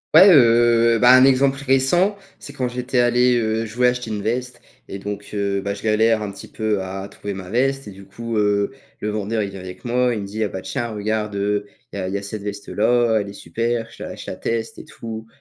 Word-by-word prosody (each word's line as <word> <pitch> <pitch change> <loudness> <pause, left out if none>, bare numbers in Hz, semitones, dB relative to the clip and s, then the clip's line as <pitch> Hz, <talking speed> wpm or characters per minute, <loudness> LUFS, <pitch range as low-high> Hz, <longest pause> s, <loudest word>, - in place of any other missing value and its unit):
Ouais, 190 - +10
heu, 115 -4 +5
ben 125 +2 +6
un - - +7
exemple 135 0 +3
récent, 145 +10 +2 0.2
c'est - - -10
quand 130 -3 -2
j'étais 125 +1 -3
allé 125 +1 +4
heu, 110 0 -1
je 110 - -11
voulais 125 0 +4
acheter 125 -2 -4
une 105 -2 -3
veste 125 +2 -2 0.3
et 100 - -6
donc 100 +1 -6
heu, 100 -1 -1
ben 100 0 -3
je - - -11
galère 110 0 +2
un 100 - -4
petit 100 - -11
peu 110 -3 -1
à 95 +1 -5
trouver 100 -1 -7
ma 90 -1 -8
veste 135 +2 0
et - - -7
du 100 0 -13
coup, 115 +3 -6
heu, 105 +1 +1 0.3
le 105 - -2
vendeur 110 +1 -1
il 100 - -5
vient 95 - -9
avec 90 +3 -10
moi, 125 0 +1
il 105 - -3
me - - -5
dit: 105 +3 -5
«Heu, - - +2
ah - - -10
ben 95 - -6
tiens 120 -3 -3
regarde, 105 -1 -2
heu, 105 +1 -1 0.3
il - - -5
y - - -2
a 95 - -3
il 95 - -4
y - - +1
a 100 - -6
cette 100 +1 -6
veste-là, 110 +3 +1
elle 100 - -6
est - - -9
super» 115 +5 -2
je - - -14
la - - -6
je - - -9
la - - -5
teste 115 -1 -3
et - - -10
tout. 110 -1 -8
110 Hz, 255 wpm, -21 LUFS, 100-120 Hz, 0.3 s, Ouais